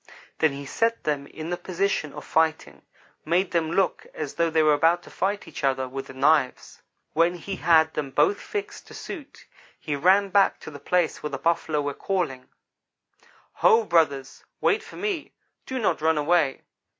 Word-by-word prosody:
Then 160 -3 +3
he 140 0 -7
set 230 +11 0
them 145 -2 -2
in 160 +3 -7
the 175 - -1
position 185 -5 -1
of 150 -2 -9
fighting; 155 - 0 0.4
made 175 +4 +1
them 165 -2 0
look 190 +1 0
as 150 -3 -4
though 170 0 +1
they 160 -1 +3
were 155 -1 +5
about 165 +4 +3
to - - -14
fight 200 +2 -2
each - - -8
other 130 -1 +1
with 135 +1 -6
the 135 - -11
knives. 135 -1 +1 0.3
When 170 +2 +3
he 190 +3 -6
had 160 -1 +4
them 145 -2 -3
both 400 - +2
fixed 415 0 -6
to - - -12
suit, 300 -7 -9 0.3
he 150 -3 -3
ran 190 +7 +4
back 195 0 +3
to - - -9
the 145 - -10
place 180 0 0
where 150 - -3
the - - -4
Buffalo 160 -2 0
were 145 0 -2
calling: 155 -11 -3 1.1
"'Ho! 225 +1 +5
brothers, 150 -8 +1 0.2
wait 430 0 +2
for - - -13
me 400 -7 -3 0.3
do 260 - -3
not 185 -10 0
run 160 0 +2
away. 150 -2 +1
160 Hz, 185 wpm, -25 LUFS, 145-190 Hz, 1.1 s, were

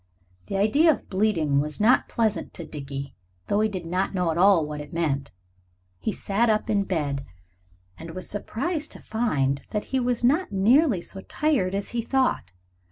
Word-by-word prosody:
The 195 - -2
idea 285 +12 +5
of 290 - -5
bleeding 180 -8 +2
was 150 +1 -2
not 225 +4 +4
pleasant 220 -3 -1
to 170 - -6
Dickie, 140 -1 -6 0.3
though 205 - +1
he 215 0 +2
did 185 -4 -5
not 180 +3 0
at 195 - -5 0.2
all 185 -1 +5
know - - -4
what 150 0 -5
it 145 0 -10
meant. 145 -5 -1 0.7
He - - -1
sat 210 +4 0
up 215 0 +1
in 200 -2 +2
bed, 145 -7 -1 0.8
and 165 +1 -8
was 185 - -6
surprised 300 - -3
to - - -11
find 140 - 0
that 210 -1 -2
he 265 - +3
was 245 -1 0
not 295 - +2
nearly 225 - +4
so 190 +2 -9
tired 225 -9 0
as 200 0 -2
he 240 - -1
thought. 255 - 0
200 Hz, 180 wpm, -25 LUFS, 160-235 Hz, 0.8 s, idea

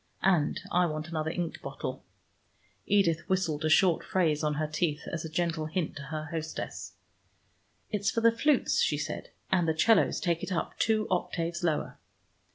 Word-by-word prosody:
And 175 -6 +3
I 180 0 +3
want 155 +1 -4
another 160 -1 -2
ink 170 0 -3
bottle." - - -5 0.8
Edith 185 -5 +3
whistled 170 -5 0
a 155 - +2
short 175 0 +4
phrase 160 -5 +1
on 150 -1 +1
her 155 +1 0
teeth, 150 0 -1
as 165 - -2
a 160 - -5
gentle 165 -1 -1
hint 160 +1 -2
to - - -6
her 155 +1 -4
hostess. 160 -1 -5 1.0
"It's 205 -2 +1
for 230 - 0
the 230 0 +6
flutes," 270 +4 +2
she 150 - +2
said, 150 - -4 0.2
"and 180 -3 +3
the 160 - +1
'cellos 225 +4 +4
take 170 -2 0
it - - -5
up 175 - -2
two 215 -1 +2
octaves 170 -1 -1
lower." 160 -3 -1
170 Hz, 170 wpm, -29 LUFS, 155-185 Hz, 1.0 s, the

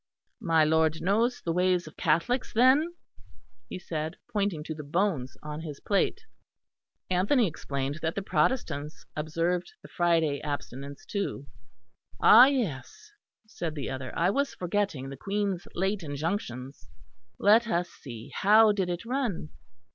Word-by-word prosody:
"My 165 -5 +3
lord 160 +1 +2
knows 225 +7 +1
the 165 - -1
ways 180 0 +2
of 155 - -12
Catholics, 170 +12 +1
then," 270 +9 +4 0.7
he - - -5
said, 160 -2 -4 0.2
pointing 200 -7 0
to 160 - -5
the 155 - -7
bones 150 -4 -1
on 150 +1 -5
his 150 -3 -7
plate. 200 - 0 0.9
Anthony 205 +8 +3
explained 140 -3 -3
that 160 0 -1
the 200 - -3
Protestants 155 - -1
observed 165 +3 -1
the - - -10
Friday 165 -4 +1
abstinence, 140 -1 -6
too. 200 -8 -3 0.7
"Ah 245 +4 +9
yes," 250 - -3 0.3
said 170 -7 -5
the 145 - -4
other, 130 -1 -5
"I 175 +3 +3
was 280 +4 -1
forgetting 180 -7 -2
the 135 - -8
Queen's 195 +1 -2
late 195 +2 0
injunctions. 140 - -4 0.5
Let 220 +3 +5
us 175 -4 0
see; 115 -5 -10
how 215 +2 +6
did 195 -3 -1
it 175 +5 -4
run? 240 - -2
175 Hz, 140 wpm, -28 LUFS, 150-205 Hz, 0.9 s, Ah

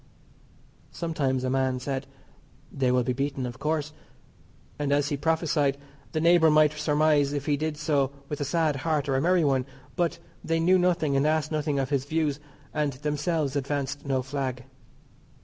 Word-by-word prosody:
Sometimes 140 -6 -1
a 130 - 0
man 130 -1 +1
said, 135 +1 -4 0.6
"They 130 -3 +1
will 125 0 +3
be 125 +1 -1
beaten 135 0 -2
of 120 0 -7
course," 150 -1 -1 0.9
and, 145 -1 -1
as 145 +1 +2
he 145 - 0
prophesied, 150 -2 +1 0.3
the 155 - -1
neighbour 170 0 +5
might 150 0 +5
surmise 150 -1 +2
if 145 -1 -3
he 150 - +2
did 155 +1 -3
so 145 -3 +1 0.2
with 150 0 -5
a - - +2
sad 150 0 +1
heart 150 0 -1
or 135 - +1
a 135 - +2
merry 175 +1 +3
one, 135 -3 +1 0.3
but 170 -2 0 0.3
they 165 0 0
knew 180 +3 +4
nothing 170 -5 +1
and 135 +2 +3
asked 155 -1 +1
nothing 150 -2 -1
of 135 +1 -1
his 135 -2 0
views, 150 -1 0 0.3
and 150 -2 0
themselves 150 +1 -1
advanced 140 0 -2
no 135 -2 0
flag. 130 -2 -3
145 Hz, 175 wpm, -27 LUFS, 135-155 Hz, 0.9 s, neighbour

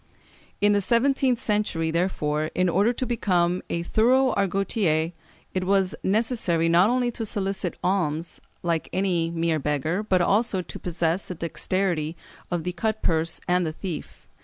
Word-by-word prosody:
In 205 0 +5
the 205 - +2
seventeenth 255 +4 +2
century, 205 -8 -1
therefore, 155 -3 0
in 180 0 +2
order 200 +7 +3
to 250 +1 -3
become 180 -7 +1
a 170 - -1
thorough 250 +7 +3
Argotier, 190 -4 +1 0.4
it 185 - -1
was 195 -1 +2
necessary 195 -5 +1
not 175 +5 +5
only 245 0 +1
to 230 - -4
solicit 195 -4 -2
alms 170 -3 -1 0.2
like 170 -2 -1
any 180 -3 0
mere 165 -1 0
beggar, 150 +6 -1
but 190 -4 +1
also 195 +1 +2
to - - -9
possess 170 +1 -1
the 180 - -6
dexterity 170 -1 -1 0.3
of 175 -2 -2
the 180 - -2
cut 220 +4 -2
purse 165 0 0
and 180 0 +2
the 160 - -1
thief. 170 -2 -7
185 Hz, 155 wpm, -25 LUFS, 165-205 Hz, 0.4 s, In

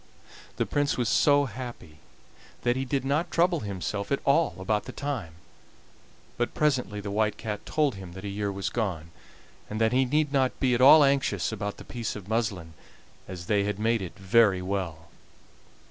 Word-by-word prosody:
The - - 0
Prince 145 0 0
was 120 -2 0
so 145 +4 +4
happy 120 - -8 0.6
that 120 0 +2
he 135 +1 -2
did 135 0 -1
not 150 +5 0
trouble 170 0 +2
himself 100 0 -4
at 140 - +2
all 140 - +3
about 105 +3 -1
the - - -7
time, 120 - -4 1.0
but 120 - -2
presently 130 -8 0
the 100 0 -5
White 105 +1 0
Cat 105 -2 -5
told 150 -4 +1
him 95 -3 -9
that 95 - -8
the 100 0 -5
year 100 0 -2
was 100 0 -3
gone, 90 -8 -3 0.6
and 105 - -4
that 110 +1 +2
he 130 +1 +3
need 150 +2 0
not 130 -2 +1
be 130 -2 +2
at 120 - +1
all 145 +3 +9
anxious 135 - +1
about 105 -1 -4
the - - -11
piece 120 -3 -4
of 100 -3 -9
muslin, 100 -7 -2 0.5
as 90 -2 -7
they 100 +1 +2
had 105 -1 -2
made 115 +1 +1
it 90 - -7
very 95 0 +4
well. 90 -4 -4
110 Hz, 185 wpm, -27 LUFS, 100-135 Hz, 1.0 s, all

